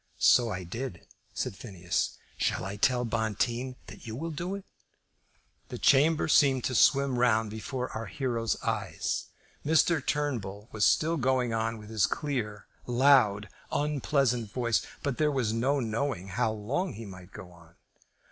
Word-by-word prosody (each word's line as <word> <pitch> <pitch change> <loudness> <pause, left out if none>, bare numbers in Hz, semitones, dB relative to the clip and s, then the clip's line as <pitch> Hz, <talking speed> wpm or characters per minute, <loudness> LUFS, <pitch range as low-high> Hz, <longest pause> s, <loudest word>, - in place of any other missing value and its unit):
"So 120 -2 +5
I 95 -3 -4
did," 100 +1 -6 0.3
said - - -3
Phineas. 90 -6 -3 0.2
"Shall - - -1
I 95 +1 -4
tell 125 +3 +2
Bonteen 115 +3 -1
that - - -12
you 110 - -5
will 165 +6 -4
do 175 +6 -3
it?" 200 - -8 1.0
The - - -6
chamber 150 +4 +4
seemed 135 -4 +4
to 130 - -1
swim 135 -1 +4
round 115 -3 +2
before 125 +4 -4
our 115 - -5
hero's 120 -6 -2
eyes. 105 -7 -2 0.4
Mr. 160 0 +3
Turnbull 115 -9 -2
was 105 -2 +2
still 165 +2 +3
going 130 -3 +1
on 115 0 -1
with 105 0 -11
his 110 -3 +3
clear, 115 -8 -3 0.2
loud, 120 -5 +4 0.2
unpleasant 135 -6 0
voice, 120 -1 +1 0.2
but 140 -4 -2
there 155 -1 +3
was 125 -6 0
no 135 +5 +1
knowing 115 -4 -2
how 100 +3 0
long 125 - -2
he 115 +2 -8
might 90 -2 -11
go 90 - -10
on. 85 -1 -19
120 Hz, 155 wpm, -29 LUFS, 105-140 Hz, 1.0 s, So